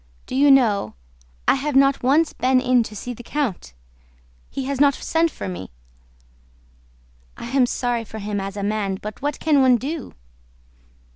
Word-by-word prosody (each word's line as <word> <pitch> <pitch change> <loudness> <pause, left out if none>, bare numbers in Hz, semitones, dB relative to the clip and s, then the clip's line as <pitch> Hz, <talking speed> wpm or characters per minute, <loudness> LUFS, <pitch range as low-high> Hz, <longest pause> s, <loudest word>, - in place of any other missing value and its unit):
"Do - - -9
you 285 +2 +5
know, 220 - +3 0.5
I - - +6
have 280 +1 -2
not 275 0 +4
once 295 +6 +2
been 255 0 +2
in 255 -1 +3
to 215 - -9
see 245 +4 -5
the 240 - -11
count. 240 - -3 0.8
He 270 - -4
has 275 +1 -2
not 280 -2 +5
sent 330 +1 0
for 100 - -7
me.... 95 0 -6 1.7
I - - -7
am 265 -2 +3
sorry 240 -1 -1
for 220 0 -10
him 205 -1 -3
as 195 +1 -6
a 200 - -3
man, 200 -2 -1
but 210 0 -8
what 290 0 -2
can 300 -3 +3
one 255 -2 +5
do?" 285 +4 -6
255 Hz, 170 wpm, -22 LUFS, 210-275 Hz, 1.7 s, I